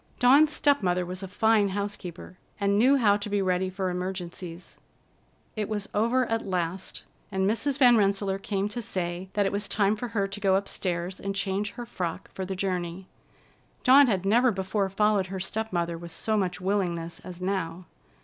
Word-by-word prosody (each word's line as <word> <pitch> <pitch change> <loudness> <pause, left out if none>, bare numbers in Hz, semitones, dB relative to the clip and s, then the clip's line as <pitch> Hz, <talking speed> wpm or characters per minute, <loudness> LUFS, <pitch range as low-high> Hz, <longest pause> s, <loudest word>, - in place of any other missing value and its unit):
Dawn's 280 +5 +6
step 285 -3 +3
mother 180 -1 +1
was 185 +2 -6
a 195 - -5
fine 215 +1 +3
housekeeper, 190 -3 -5 0.2
and 200 -1 +2
knew 265 +5 +5
how 205 -5 +4
to 205 0 -5
be 205 0 +1
ready 185 -1 +1
for 185 -1 -2
emergencies. 180 -1 -6 0.8
It 215 -2 -2
was 210 -1 -2
over 235 +5 +2
at 225 -1 -1
last, 185 -1 -3 0.3
and 190 0 +1
Mrs. 260 +6 0
Van 245 -4 +6
Rensselaer 195 -1 +1
came 200 0 -1
to 240 +3 -4
say 180 -2 -3
that 205 -1 +2
it 195 - +1
was 200 0 -2
time 200 +2 +2
for 245 +3 -4
her 210 -4 -1
to 200 +1 -7
go 195 -2 +3
upstairs 185 -2 -2
and 195 0 -4
change 195 +1 -1
her 240 - -7
frock 180 -7 -5
for 190 - -4
the 190 +1 -4
journey. 180 -1 -3 0.7
Dawn 275 +2 +7
had 195 -5 0
never 240 +6 +4
before 195 -1 -1
followed 205 -1 +2
her 190 0 -5
step 220 +4 -3
mother 170 -2 -1
with 170 0 -8
so 195 +7 -1
much 185 -4 -1
willingness 180 -3 -1
as 180 -1 -10
now. 185 -2 -3
195 Hz, 190 wpm, -27 LUFS, 185-210 Hz, 0.8 s, Dawn